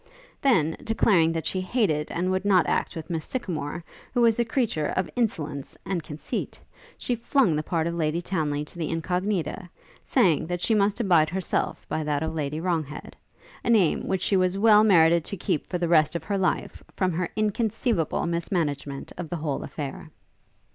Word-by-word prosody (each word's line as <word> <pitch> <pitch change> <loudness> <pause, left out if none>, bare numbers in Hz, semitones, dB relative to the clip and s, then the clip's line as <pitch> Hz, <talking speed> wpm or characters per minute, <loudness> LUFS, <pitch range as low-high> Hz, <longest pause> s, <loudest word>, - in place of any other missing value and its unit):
Then, 165 - +3
declaring 195 -7 +3
that 165 -1 -3
she 185 - -1
hated 185 -7 0
and 180 +2 -1
would 185 0 0
not 190 -4 +4
act - - -1
with 165 +2 -6
Miss 160 -2 -2
Sycamore, 170 - -4 0.3
who 245 - +3
was 230 -1 +4
a - - +4
creature 225 - 0
of 185 - -1
insolence 150 - -2
and 185 -3 -1
conceit, 155 0 -5 0.4
she 245 - -2
flung 235 - +2
the 150 - 0
part 160 +1 -1
of 170 - -1
Lady 160 -1 0
Townly 150 -5 -2
to 170 - -13
the 160 - -2
Incognita, 180 +1 -2 0.3
saying, 160 -4 +2
that 175 0 -2
she 225 - +1
must 205 +1 +2
abide 170 -8 +4
herself 185 0 -2
by 155 - -2
that 150 0 -1
of 160 0 -2
Lady 150 -1 -2
Wronghead; 160 -4 -3 0.5
a - - -2
name 205 -8 +3
which 190 -1 -1
she 200 - +2
well 200 +4 +5
merited 170 -5 +5
to 200 - -5
keep 155 - -1
for 180 - -2
the 175 -1 -1
rest 160 -1 +4
of 170 - -3
her 200 - -1
life, 185 -2 -1
from 185 -1 0
her 175 +1 -2
inconceivable 215 -3 0
mismanagement 165 -5 -2
of 170 -3 -5
the 175 - -3
whole 150 -3 -3
affair. 150 +4 -6
175 Hz, 180 wpm, -26 LUFS, 155-200 Hz, 0.5 s, well